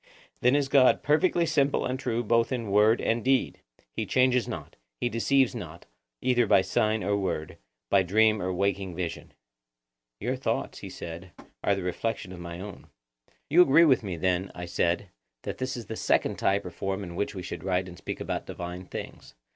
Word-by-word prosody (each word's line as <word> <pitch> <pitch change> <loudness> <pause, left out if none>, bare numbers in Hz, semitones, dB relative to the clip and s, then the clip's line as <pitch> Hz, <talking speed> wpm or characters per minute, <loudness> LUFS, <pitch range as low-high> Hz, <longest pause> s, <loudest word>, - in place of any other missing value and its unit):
Then 125 +3 +4
is 145 -1 +2
God 135 -2 +4
perfectly 170 +3 +3
simple 140 -3 +1
and 130 +1 -2
true 120 -2 -1
both 115 +2 +2
in 115 -5 -3
word 105 +3 +5
and 115 0 0
deed; 130 0 +1 0.3
he - - -3
changes 125 -1 +3
not; - - -7 0.2
he 120 - 0
deceives 130 +3 +2
not, 85 -8 -8 0.4
either 120 -2 +2
by 95 - +5
sign 110 -1 +1
or 100 +2 +1
word, 90 -6 -3 0.3
by 100 - +6
dream 110 +3 +3
or 95 - -1
waking 95 -1 -1
vision. 85 -1 -5 0.9
Your - - -1
thoughts, - - -2
he - - -8
said, 85 +1 -8 0.3
are 100 - +3
the 95 - -4
reflection 95 +2 -3
of 90 - -9
my 85 0 -7
own. 100 0 -9 0.6
You 170 +5 +6
agree 165 +1 +6
with 135 -6 +4
me 95 -6 -4
then, 95 +2 0
I 90 - -5
said, 85 +1 0 0.3
that - - -5
this 130 0 -3
is 120 - -7
the 110 - -6
second - - +1
type 100 0 +1
or 90 - -6
form 95 +2 -3
in 85 -2 -7
which 100 +2 -2
we 95 - -5
should - - -6
write 95 0 0
and 90 - -9
speak - - -6
about - - -4
divine 90 +1 -6
things. - - -8
100 Hz, 195 wpm, -27 LUFS, 90-125 Hz, 0.9 s, by